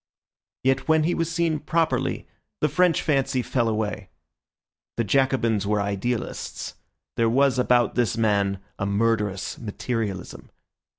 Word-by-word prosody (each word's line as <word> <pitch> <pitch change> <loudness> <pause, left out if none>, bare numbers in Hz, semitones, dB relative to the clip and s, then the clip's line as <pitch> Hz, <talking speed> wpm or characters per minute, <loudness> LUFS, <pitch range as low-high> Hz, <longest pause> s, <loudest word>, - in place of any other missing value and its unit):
Yet 135 0 +1
when 160 -1 +4
he 175 +3 +1
was 165 0 -1
seen 165 -2 0
properly, 160 +2 0 0.3
the 150 - +3
French 175 +3 +2
fancy 135 -4 +1
fell 120 -2 0
away. 110 -1 -2 0.9
The 115 - +2
Jacobins 115 -4 +1
were 105 0 +1
idealists; 100 +4 -3 0.4
there 115 -1 +3
was 135 +2 +3
about 125 -1 +3
this 120 -2 0
man 100 -3 +2 0.2
a 100 - -1
murderous 105 -2 0
materialism. 110 -3 -4
120 Hz, 125 wpm, -24 LUFS, 105-140 Hz, 0.9 s, when